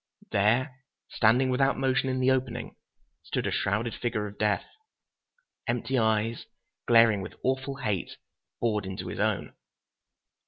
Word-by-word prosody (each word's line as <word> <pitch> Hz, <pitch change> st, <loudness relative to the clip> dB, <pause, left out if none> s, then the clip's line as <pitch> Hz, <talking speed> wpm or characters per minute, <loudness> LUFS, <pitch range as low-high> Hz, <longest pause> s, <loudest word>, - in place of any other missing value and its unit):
There, 120 Hz, +7 st, +2 dB, 0.3 s
standing 125 Hz, +4 st, +3 dB
without 135 Hz, +2 st, +2 dB
motion 135 Hz, 0 st, +1 dB
in 130 Hz, 0 st, -1 dB
the 130 Hz, +1 st, +3 dB
opening, 130 Hz, -2 st, -2 dB, 0.5 s
stood -, -, -3 dB
a -, -, 0 dB
shrouded 110 Hz, +3 st, 0 dB
figure 115 Hz, -3 st, -2 dB
of 105 Hz, 0 st, -9 dB
death. 105 Hz, -1 st, +1 dB, 1.0 s
Empty 120 Hz, +2 st, 0 dB
eyes, 110 Hz, +1 st, 0 dB, 0.4 s
glaring 115 Hz, -3 st, +6 dB
with 95 Hz, -, -8 dB
awful 130 Hz, +1 st, -1 dB
hate, 105 Hz, -9 st, -3 dB, 0.4 s
bored 105 Hz, -4 st, 0 dB
into 95 Hz, -1 st, -5 dB
his -, -, -6 dB
own. 100 Hz, -8 st, 0 dB
115 Hz, 130 wpm, -28 LUFS, 105-130 Hz, 1.0 s, glaring